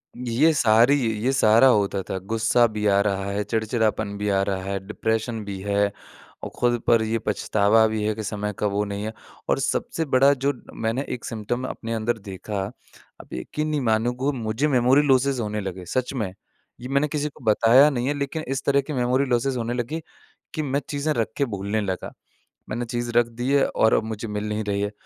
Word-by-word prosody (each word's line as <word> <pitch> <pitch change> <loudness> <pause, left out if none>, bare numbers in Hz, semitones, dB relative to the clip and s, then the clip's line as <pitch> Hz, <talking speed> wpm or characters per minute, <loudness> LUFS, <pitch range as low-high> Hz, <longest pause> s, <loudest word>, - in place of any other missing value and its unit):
ये 125 +6 +2
सारी 120 0 +5 0.3
ये 130 - +2
सारा 115 0 +5
होता 100 -5 +2
था, 95 - -4
गुस्सा 115 +4 +2
भी 105 -1 -4
आ 100 0 +4
रहा 100 -1 -1
है 105 +1 -1
चिड़चिड़ापन 110 -1 -1
भी 105 0 -2
आ 95 -1 +2
रहा 95 -1 -2
है 100 0 -2
डिप्रेशन 110 +1 -2
भी 100 -1 -5
है, 100 0 +1 0.5
और - - -4
खुद 120 -1 +2
पर 115 -1 +5
ये 110 +1 -1
पछतावा 105 +1 +2
भी 110 -1 -2
है 110 +1 +1
कि 110 - -5
समय 105 0 -3
का 105 - +1
वो 100 +1 0
नहीं 100 0 -4
है। 110 - -4 0.4
और - - +2
सबसे 165 - -1
बड़ा 135 0 +4
जो 140 +1 0 0.2
मैंने 115 +5 -2
1 125 - -6
सिम्पटम 115 +3 -3
अपने 115 -2 -5
अंदर 115 +1 -1
देखा। 100 0 -6 0.6
आप - - -15
यकीन 150 - -3
नहीं 150 -2 0
मानोगे 120 +4 +1
मुझे 110 +6 -1
मेमोरी 130 0 +4
लॉसेस 135 0 +3
होने 105 -2 -2
लगे, 95 -2 -6
सच 130 +9 -2
में। 105 -8 -3 0.5
ये 125 - -6
मैंने 140 +2 +1
किसी 150 0 -2
को 140 - -18
बताया 115 +6 +6
नहीं 125 -3 -2
है 145 - +1
लेकिन 145 +3 -3
इस 135 +1 -2
तरह 140 0 +3
के 150 - -3
मेमोरी 125 +2 +1
लॉसेस 130 +1 0
होने 120 0 -2
लगे 125 +7 -3 0.5
कि 155 - -1
मैं 140 0 -1
चीज़ें 145 +1 -1
रख 115 -4 0
के 140 - +2
भूलने 100 +2 -1
लगा। 95 -3 -4 0.6
मैंने 120 +2 -3
चीज़ 120 0 -3
रख 120 -1 +5
दी 125 +2 0
है 140 -1 +4
और 110 - +2
अब - - +1
मुझे 110 0 -5
मिल 105 0 -3
नहीं 105 +1 -2
रही 100 -1 -1
है। 100 0 -1
115 Hz, 210 wpm, -24 LUFS, 105-130 Hz, 0.6 s, बताया